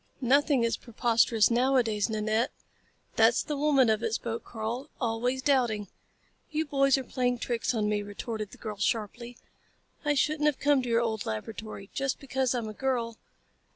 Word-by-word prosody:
"Nothing 275 0 +3
is 230 - +1
preposterous 230 -1 +2
nowadays, 235 -4 +2
Nanette." 220 +3 0 0.7
"That's 225 +1 +5
the 300 - -3
woman 280 -3 +3
of 220 0 +2
it," 225 -1 -1
spoke 230 -1 -4
Karl. 235 +5 -5
"Always 245 +2 -1
doubting." 240 -8 +1 0.6
"You 315 0 -1
boys 275 -2 +3
are 265 - -3
playing 250 -1 0
tricks 240 +1 -1
on 210 -2 +1
me," 210 0 0
retorted 210 +1 -5
the - - -14
girl 215 -2 -6
sharply. 230 +3 -2 0.7
"I 295 -1 +1
shouldn't 300 +2 +2
have 295 - +2
come 290 -2 +3
to 250 - -4
your 230 0 +3
old 220 -3 -2
laboratory. 195 - -6
Just 275 -1 -1
because 265 -2 -1
I'm 235 -3 -2
a 215 - -6
girl...." 235 -2 -2
235 Hz, 165 wpm, -28 LUFS, 220-265 Hz, 0.7 s, That's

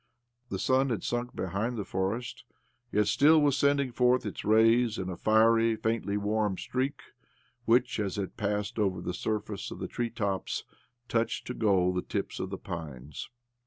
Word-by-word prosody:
The 95 - -2
sun 130 +6 +2
had 115 - -2
sunk 120 0 -2
behind 100 +7 -2
the 105 - -3
forest, 100 +6 -3 0.5
yet 105 0 +3
still 150 +10 +5
was 145 -2 +3
sending 140 -2 +2
forth 125 +1 +2 0.2
rays 115 +2 +4
in 95 -1 -3
a - - -4
fiery, 115 +2 +4
faintly 110 -2 -1
warm 105 -1 0
streak 130 +1 -2 0.6
which, 125 +2 +3
as 100 -3 -2
it 100 -2 -4
passed 105 0 -2
over 95 -3 +1
the 90 - -4
surface 105 +1 -3
of - - -7
the - - -4
treetops, 110 -5 -2 0.4
touched 115 0 -1
to 125 - -4
gold 95 -6 +2
the - - +1
tips - - -4
of - - -3
the - - -4
pines. 75 -4 -7
110 Hz, 160 wpm, -29 LUFS, 100-120 Hz, 0.6 s, still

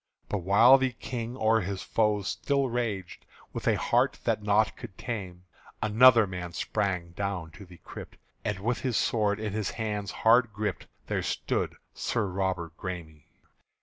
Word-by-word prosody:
But 105 - -1
while 105 +9 +6
the 130 -1 0
King 120 +1 -5
o'er 110 -1 +3
his 95 0 -4
foes 105 -3 +1
still 140 -2 0
raged 110 -7 -3 0.3
With - - -5
a - - +4
heart - - +2
that - - 0
naught 105 +1 +2
could 115 -7 -10
tame, 95 -7 -5 0.4
Another 115 +1 +6
man 90 -2 -6
sprange 90 -4 -2
down 95 -4 -3
to 95 +4 -13
the 90 -1 -14
crypt; - - -11 0.3
And 105 -2 -1
with 120 +3 0
his 125 -4 -1
sword 105 -2 +1
in 105 -2 -3
his 105 -2 -1
hand 105 -3 -3
hard 115 +2 +4
gripp'd, 105 -1 -3 0.2
There - - -1
stood - - -2 0.2
Sir 110 - -1
Robert 90 -3 -2
Græme. 80 -5 -7
105 Hz, 160 wpm, -28 LUFS, 95-115 Hz, 0.4 s, while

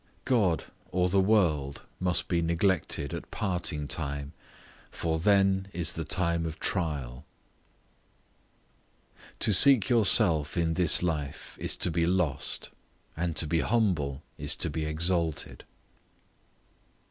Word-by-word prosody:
God 105 -11 +1 0.3
or 90 0 +1
the 100 +2 +2
world 85 -9 +1 0.2
must 90 -1 0
be 85 -2 0
neglected 85 -4 0
at - - -7
parting 85 -6 -1
time, 70 0 -4 0.6
for 80 -1 -2
then 95 +1 +2
is 85 0 0
the 80 - -4
time 85 0 -1
of 80 - -7
trial. 70 -8 -3 2.2
To 105 - +4
seek 125 +2 +7
yourself 95 - +3
in 85 -1 +1
this 85 0 +3
life 75 -5 -4
is - - -1
to 90 - -2
be 85 0 0
lost; 85 -7 -1 0.4
and 85 0 -2
to 80 - -2
be 80 +2 0
humble 80 - 0 0.2
is - - +1
to - - -2
be 80 0 -3
exalted. 80 0 -2
85 Hz, 125 wpm, -28 LUFS, 75-95 Hz, 2.2 s, seek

